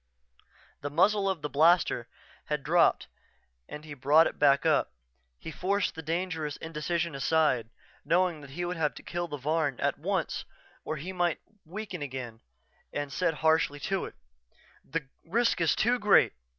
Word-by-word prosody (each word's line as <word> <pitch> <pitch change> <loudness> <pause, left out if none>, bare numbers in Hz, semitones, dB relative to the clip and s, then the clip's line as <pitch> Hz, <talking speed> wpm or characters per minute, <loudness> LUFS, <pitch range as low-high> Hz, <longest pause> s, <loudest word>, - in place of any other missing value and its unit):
The 145 - -3
muzzle 195 +6 +3
of 175 -6 -3
the - - 0
blaster 155 -5 +3 0.4
had 150 -2 -2
dropped 170 +3 +3 0.6
and 150 +1 -8
he 150 - -8
brought 145 +4 +5
it - - -4
back 140 +1 +4
up. 155 - +2 0.5
He 160 - -8
forced 195 +5 0
the 160 - -7
dangerous 160 -2 -3
indecision 165 +1 -2
aside, 135 -4 +1 0.3
knowing 175 -2 +1
he 175 +6 -4
would 175 0 -3
have 150 -2 0
to - - -11
kill 175 0 -3
the 145 - -5
Varn 150 -1 -1
at - - 0
once - - -2 0.4
or 155 - -3
he 180 +6 -6
might 175 -3 0 0.3
weaken 185 0 -6
again, 125 -5 -6 0.5
and 145 -1 -4
said 170 -4 0
harshly 160 -2 +3
to 195 -2 -1
it: - - -10 0.7
"The 165 -3 -4 0.2
risk 230 +2 +1
is 165 - +3
too 245 +2 +2
great. 210 -2 +5
160 Hz, 160 wpm, -29 LUFS, 145-175 Hz, 0.7 s, brought